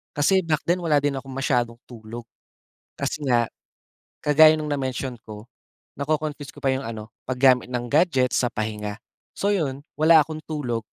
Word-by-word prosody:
Kasi 190 Hz, +7 st, +3 dB
back 155 Hz, -3 st, 0 dB
then 175 Hz, +1 st, +2 dB
wala 150 Hz, -3 st, +3 dB
din 145 Hz, -1 st, +1 dB
akong 135 Hz, 0 st, -11 dB
masyadong 120 Hz, -3 st, 0 dB
tulog. 115 Hz, 0 st, -9 dB, 0.8 s
Kasi 150 Hz, -, -3 dB
nga, 120 Hz, -3 st, +3 dB, 0.8 s
kagaya 155 Hz, +1 st, +7 dB
nung 155 Hz, -, -4 dB
na-mention 130 Hz, -2 st, -2 dB
ko, 105 Hz, +1 st, -10 dB, 0.5 s
nako-confuse 150 Hz, 0 st, -2 dB
ko -, -, -15 dB
pa 135 Hz, -, +2 dB
yung 135 Hz, -, -3 dB
ano, 110 Hz, -1 st, -7 dB, 0.2 s
pag-gamit 125 Hz, -1 st, +3 dB
ng 120 Hz, -1 st, -2 dB
gadget 140 Hz, -5 st, +3 dB
sa 125 Hz, -, +2 dB
pahinga. 105 Hz, -1 st, -4 dB, 0.4 s
So 200 Hz, -, 0 dB
yun, 140 Hz, -7 st, -2 dB
wala 160 Hz, +1 st, +6 dB
akong 155 Hz, 0 st, -7 dB
tulog, 125 Hz, -7 st, -3 dB
135 Hz, 160 wpm, -24 LUFS, 120-155 Hz, 0.8 s, kagaya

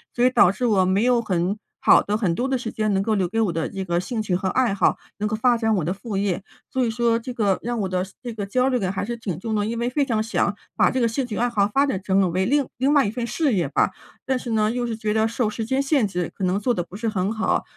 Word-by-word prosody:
所 240 Hz, -, +1 dB
以 255 Hz, -, +6 dB
导 195 Hz, -7 st, +5 dB
致 245 Hz, +4 st, -1 dB
我 190 Hz, -4 st, +3 dB
没 190 Hz, +4 st, +2 dB
有 245 Hz, -2 st, +3 dB
很 185 Hz, 0 st, -1 dB, 0.2 s
好 -, -, +5 dB
的 210 Hz, +1 st, -1 dB
很 180 Hz, -7 st, 0 dB
多 255 Hz, +5 st, -1 dB
的 265 Hz, -, +1 dB
时 235 Hz, -2 st, -5 dB
间， 215 Hz, -2 st, 0 dB
能 195 Hz, -, +2 dB
够 215 Hz, +1 st, 0 dB
留 185 Hz, -3 st, +1 dB
给 225 Hz, +2 st, -1 dB
我 200 Hz, -6 st, +1 dB
的 165 Hz, -1 st, -2 dB
这 190 Hz, -1 st, -5 dB
个 175 Hz, -1 st, 0 dB
兴 230 Hz, +1 st, -3 dB
趣 190 Hz, -4 st, -1 dB
和 190 Hz, 0 st, -1 dB
爱 250 Hz, -6 st, +2 dB
好， 200 Hz, -, +2 dB, 0.2 s
能 210 Hz, -, 0 dB
够 215 Hz, -, -1 dB
发 240 Hz, +1 st, +3 dB
展 225 Hz, -1 st, +1 dB
我 170 Hz, -, 0 dB
的 180 Hz, -, 0 dB
副 200 Hz, 0 st, -5 dB
业， 195 Hz, -1 st, -1 dB, 0.3 s
所 260 Hz, -1 st, 0 dB
以 225 Hz, -, 0 dB
说 235 Hz, 0 st, +2 dB
这 250 Hz, +2 st, -6 dB
个 205 Hz, -5 st, +1 dB
让 240 Hz, -1 st, -2 dB
我 195 Hz, -, 0 dB
的 185 Hz, 0 st, -1 dB, 0.2 s
这 240 Hz, -3 st, -6 dB
个 205 Hz, -2 st, -4 dB
焦 250 Hz, +6 st, +1 dB
虑 255 Hz, -2 st, +2 dB
感 190 Hz, -4 st, -1 dB
还 200 Hz, -, -3 dB
是 235 Hz, +1 st, -3 dB
挺 190 Hz, -8 st, -5 dB
重 220 Hz, +2 st, -3 dB
的。 205 Hz, 0 st, 0 dB
因 230 Hz, +1 st, -3 dB
为 240 Hz, -, 0 dB
非 280 Hz, +2 st, +1 dB
常 225 Hz, -4 st, 0 dB
想 220 Hz, -2 st, 0 dB, 0.2 s
把 -, -, +3 dB
这 260 Hz, -, -1 dB
个 235 Hz, -, +3 dB
兴 250 Hz, +4 st, -1 dB
趣 215 Hz, -5 st, -5 dB
爱 245 Hz, -, +2 dB
好 205 Hz, -4 st, +2 dB
发 275 Hz, +1 st, +4 dB
展 190 Hz, -8 st, -1 dB
成 190 Hz, 0 st, +2 dB
了 190 Hz, -, +3 dB
为 185 Hz, +2 st, 0 dB
另 280 Hz, +2 st, +2 dB
另 270 Hz, +3 st, +2 dB
外 285 Hz, -5 st, +5 dB
一 -, -, 0 dB
份 240 Hz, 0 st, -3 dB
事 285 Hz, +2 st, 0 dB
业 175 Hz, -8 st, 0 dB
吧， 170 Hz, -, +2 dB, 0.3 s
但 260 Hz, -1 st, +1 dB
是 245 Hz, -2 st, -5 dB
呢， 215 Hz, -1 st, +2 dB
又 245 Hz, +1 st, -1 dB
是 230 Hz, -2 st, -3 dB
觉 215 Hz, -1 st, -1 dB
得 220 Hz, 0 st, +2 dB
受 230 Hz, -1 st, -1 dB
时 220 Hz, +1 st, -4 dB
间 265 Hz, +3 st, +1 dB
限 275 Hz, -5 st, +2 dB
制， 180 Hz, -3 st, -2 dB
可 195 Hz, -, -6 dB
能 185 Hz, +2 st, +1 dB
做 240 Hz, +4 st, +1 dB
得 175 Hz, -, -2 dB
不 180 Hz, +3 st, -11 dB
是 225 Hz, +1 st, -3 dB
很 195 Hz, 0 st, -1 dB
好， 220 Hz, 0 st, 0 dB
220 Hz, 335 characters per minute, -23 LUFS, 195-240 Hz, 0.3 s, 以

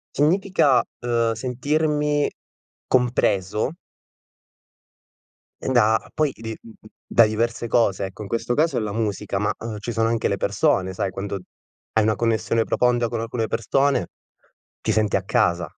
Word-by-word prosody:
Significa, 150 Hz, -4 st, +3 dB, 0.2 s
uhm, 115 Hz, -1 st, +1 dB
sentirmi 150 Hz, +3 st, 0 dB, 0.6 s
compreso 115 Hz, -4 st, +1 dB, 1.9 s
e -, -, -3 dB
da 110 Hz, -4 st, +4 dB
poi 155 Hz, -3 st, +1 dB
di, 110 Hz, 0 st, -7 dB
m 115 Hz, -, -13 dB
m 110 Hz, -, -17 dB, 0.2 s
da 115 Hz, -, +5 dB
diverse 115 Hz, +2 st, -1 dB
cose, 100 Hz, -5 st, +2 dB
ecco 95 Hz, +3 st, -9 dB
in 100 Hz, -, -7 dB
questo 115 Hz, +3 st, -1 dB
caso 160 Hz, +5 st, +2 dB
è -, -, 0 dB
la 105 Hz, -2 st, -3 dB
musica, 105 Hz, -3 st, -2 dB
ma, 105 Hz, -, 0 dB
uhm, 110 Hz, -2 st, -5 dB
ci 110 Hz, +3 st, -4 dB
sono 115 Hz, 0 st, +1 dB
anche 115 Hz, -1 st, 0 dB
le -, -, -1 dB
persone 95 Hz, 0 st, +1 dB
sai, 95 Hz, -, -1 dB
quando 100 Hz, +1 st, -4 dB, 0.5 s
hai 110 Hz, -, +3 dB
una 110 Hz, +1 st, +2 dB
connessione 115 Hz, 0 st, +1 dB
profonda 120 Hz, 0 st, +2 dB
con 115 Hz, 0 st, -3 dB
alcune 115 Hz, 0 st, -2 dB
persone, 135 Hz, +6 st, +1 dB, 0.8 s
ti -, -, 0 dB
senti 105 Hz, -2 st, +1 dB
a 95 Hz, -, 0 dB
casa. 90 Hz, -5 st, +1 dB
115 Hz, 150 wpm, -23 LUFS, 105-125 Hz, 1.9 s, da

